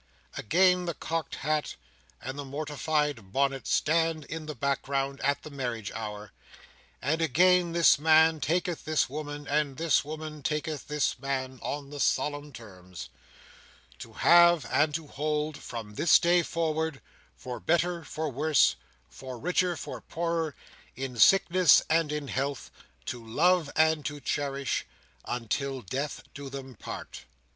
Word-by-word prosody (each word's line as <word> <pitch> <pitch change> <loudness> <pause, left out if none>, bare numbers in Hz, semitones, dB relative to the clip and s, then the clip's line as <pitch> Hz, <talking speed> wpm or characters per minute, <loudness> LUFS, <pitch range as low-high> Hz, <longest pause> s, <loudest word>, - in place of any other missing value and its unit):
Again, 180 - +3
the 170 -2 -3
cocked 165 -1 -3
hat 155 0 0 0.4
and 130 +1 -6
the - - -3
mortified 145 -5 -2
bonnet 135 +1 0
stand 160 -1 +1
in 155 +1 -6
the 150 - -5
background 140 +1 -1
at 140 0 +1
the 155 - -9
marriage 120 -7 -4
hour; 105 -2 -6 0.7
and 155 +5 0
again 175 +3 +4
this 170 -4 +5
man 160 +1 +5
taketh 175 +1 -1
this 155 -4 0
woman, 145 0 -6
and 145 -2 0
this 165 -2 +2
woman 155 0 -7
taketh 150 +1 -3
this 150 -3 0
man, 130 -1 -3
on 140 -1 -5
the 145 - -7
solemn 145 +1 0
terms: 90 -7 -11 0.9
"To - - -10
have 170 -4 +6
and 150 - +3
to 165 -1 -4
hold, 150 +1 -2
from 115 -6 -7
this 165 - +5
day 175 +1 +3
forward, 160 -3 -2 0.4
for 125 -1 -7
better 170 0 0
for 155 +1 -4
worse, 150 +3 +3 0.3
for 130 -2 -9
richer 180 +4 0
for - - -7
poorer, 165 -2 -2 0.4
in 130 -1 -5
sickness 185 - +6
and 160 -2 +2
in 150 -1 -3
health, 135 +1 -3 0.3
to 120 -2 -5
love 160 +7 +2
and 160 -1 +3
to 145 0 -6
cherish, 140 0 -2 0.4
until 130 +2 -3
death 140 +9 -4
do 140 -1 -8
them 135 -1 -8
part." 105 - -8
150 Hz, 140 wpm, -28 LUFS, 135-160 Hz, 0.9 s, have